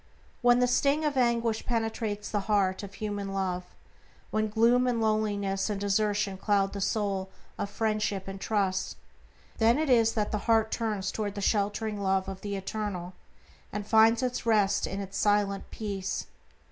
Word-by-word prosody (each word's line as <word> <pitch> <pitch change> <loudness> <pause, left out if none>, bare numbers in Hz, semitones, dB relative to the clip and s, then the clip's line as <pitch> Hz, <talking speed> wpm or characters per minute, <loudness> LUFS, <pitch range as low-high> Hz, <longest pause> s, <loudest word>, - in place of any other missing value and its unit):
When 245 -1 +5
the 250 - +4
sting 280 +5 +2
of 295 -2 0
anguish 235 -3 +1
penetrates 225 -3 -2
the 210 - +1
heart 195 -3 +2
of 200 -1 -9
human 205 -1 -4
love; 180 -2 -1 0.7
when 215 0 0
gloom 235 +3 +3
and 240 -2 +1
loneliness 205 -3 0
and 205 -2 -2
desertion 205 -1 0
cloud 195 0 +1
the 200 - -4
soul 195 -2 -1 0.3
of 200 - -2
friendship 210 -2 -1
and 195 0 -7
trust, 195 -3 -1 0.6
then 230 +3 +4
it 305 -3 +1
is 225 -2 +4
that 210 -2 -1
the 210 - -1
heart 225 -1 +4
turns 215 -4 -1
toward 210 -2 -3
the - - -4
sheltering 205 +1 0
love 190 -1 +1
of 195 -1 -6
the 200 -1 -3
Eternal, 195 -2 -4 0.6
and 205 0 -4
finds 230 +3 +3
rest 210 -4 +2
in 195 +1 -4
its 195 0 -6
silent 205 -1 +1
peace. 200 -3 -4
210 Hz, 160 wpm, -28 LUFS, 195-225 Hz, 0.7 s, When